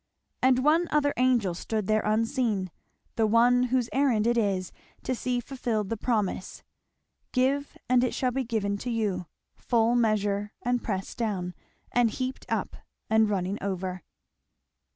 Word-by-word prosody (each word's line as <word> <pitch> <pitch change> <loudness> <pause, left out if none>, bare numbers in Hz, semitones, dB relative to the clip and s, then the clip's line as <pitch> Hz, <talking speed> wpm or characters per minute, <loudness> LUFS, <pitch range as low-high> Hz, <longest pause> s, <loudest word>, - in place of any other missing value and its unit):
And 255 0 +4
one 330 +3 +4
other 290 -1 +2
angel 245 -7 +2
stood 215 +4 -3
there 215 +2 +2
unseen, 220 -3 0 0.5
the 220 -1 +3
one 245 +3 +4
whose 250 -1 +1
errand 255 -6 +2
it 240 0 +3
is 195 -5 0 0.3
to - - -1
see 250 0 -1
fulfilled 235 -5 -2
the 230 - -1
promise, 210 -5 -2 0.7
"Give 275 +3 0
and 250 0 +4
it 250 - 0
shall 255 -1 +1
be 265 +2 -1
given 205 -4 -1
to 250 - -4
you; 205 -7 -1 0.3
full 235 -1 +1
measure, 210 -3 +1
and 245 0 0
pressed 195 0 -4
down, 190 -6 -2 0.4
and 245 -1 +3
heaped 255 +3 -4
up, - - -2 0.3
and 220 -1 +4
running 195 0 -1
over." 185 -2 -3
230 Hz, 150 wpm, -27 LUFS, 205-250 Hz, 0.7 s, And